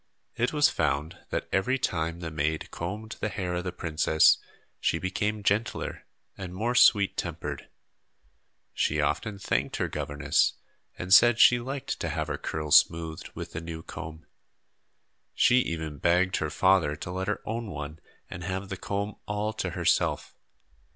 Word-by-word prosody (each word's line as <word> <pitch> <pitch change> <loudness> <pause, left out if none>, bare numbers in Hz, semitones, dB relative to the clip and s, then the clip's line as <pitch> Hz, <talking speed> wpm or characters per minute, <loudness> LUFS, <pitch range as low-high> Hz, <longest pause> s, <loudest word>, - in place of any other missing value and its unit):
It 120 +1 0
was 150 -1 +4
found 75 0 -1
that - - -2
every 110 +8 +1
time 85 -7 -2
the 80 -1 -5
maid 75 +1 -2
combed 105 +6 -5
the 105 - -1
hair 90 -4 -3
of 90 0 -2
the 90 - -3
princess 80 -2 +3 0.4
she - - +1
became 105 +4 -2
gentler 105 +2 -1 0.3
and 90 -2 -7
more 115 +5 0
sweet 105 -5 +5
tempered. - - -5 1.0
She - - 0
often 105 -2 -1
thanked - - -1
her - - -1
governess 75 +1 +1 0.4
and 90 +1 0
said 120 +1 +7
she 120 - +7
liked 135 +2 -4
to 85 - -2
have 80 0 -2
her 75 - -3
curls 75 -2 +5
smoothed 80 -1 -4
with - - -6
the 80 - -5
new 80 -1 -7
comb. 80 -1 -8 1.1
She 125 - +5
even 80 - -3
begged 90 +3 +2
her 80 - -1
father 90 -2 +3
to 90 - -7
let 95 +1 -3
her 105 - -2
own 115 +1 -3
one 75 -1 -6 0.3
and 85 - -8
have 95 +2 -4
the 95 - -4
comb 100 +2 -3
all 105 +1 -2
to - - -3
herself. - - 0
90 Hz, 160 wpm, -28 LUFS, 80-105 Hz, 1.1 s, said